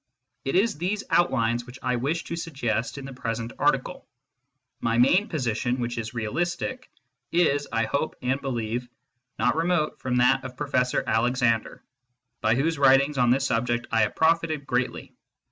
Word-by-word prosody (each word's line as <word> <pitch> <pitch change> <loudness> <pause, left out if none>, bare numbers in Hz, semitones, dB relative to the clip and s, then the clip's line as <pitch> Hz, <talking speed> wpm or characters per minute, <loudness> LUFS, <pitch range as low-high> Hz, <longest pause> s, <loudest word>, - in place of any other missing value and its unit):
It 135 - -1
is 195 -5 +2
these 195 +4 -1
outlines 120 -7 +2
which 125 +2 -10
I 125 0 +1
wish 145 +7 -1
to 170 - -5
suggest 135 -8 -2
in 140 - -7
the 135 - -8
present 115 -1 -4
article. - - 0 0.7
My 115 0 0
main 175 - +4
position, 125 -3 -1
which 120 0 -2
is 115 +2 -6
realistic, 175 - -2 0.4
is, 145 -4 +2
I 115 -1 +1
hope 140 +7 -2
and 130 +2 0
believe, 120 -2 -3 0.5
not 120 +5 +2
remote 165 -1 0
from 125 -1 -2
that 125 0 +3
of 125 -1 -8
Professor 130 -3 0
Alexander, 115 0 +1 0.6
by 110 +1 +3
whose 155 +4 0
writings 135 +1 +4
on 125 -1 +4
this 135 +3 +3
subject 120 -1 0
I 115 -1 +3
have 105 - +1
profited 160 -2 +1
greatly. 125 -1 -2
130 Hz, 160 wpm, -26 LUFS, 120-155 Hz, 0.7 s, main